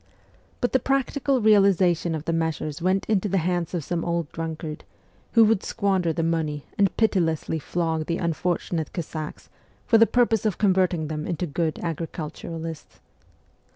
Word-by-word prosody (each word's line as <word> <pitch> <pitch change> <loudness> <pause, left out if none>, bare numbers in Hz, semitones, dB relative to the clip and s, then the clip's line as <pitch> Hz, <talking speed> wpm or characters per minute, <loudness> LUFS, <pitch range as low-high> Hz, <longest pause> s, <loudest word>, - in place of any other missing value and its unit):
But 245 - +1
the 260 - +4
practical 275 0 0
realization 190 -5 +4
of 155 0 -6
the 165 - 0
measures 160 -2 -2
went 185 +2 +1
into 205 -1 +1
the 195 - +1
hands 175 0 -1
of 165 - -2
some 170 +2 -2
old 170 -2 -2
drunkard, 160 -1 -5 0.5
who 230 -2 +7
would 215 -2 +3
squander 190 -5 0
the 165 +1 -1
money 160 -3 -1
and 195 -3 +2
pitilessly 165 -7 +1
flog 160 0 -2
the 170 - 0
unfortunate 170 -1 -2
Cossacks 155 -2 -6 0.4
for 225 - +5
the 230 - +7
purpose 235 -4 +2
of 215 -5 0
converting 185 -5 +2
them 150 0 -4
into 175 0 -2
good 160 0 -1
agriculturalists. 165 0 -5
170 Hz, 155 wpm, -25 LUFS, 160-195 Hz, 0.5 s, who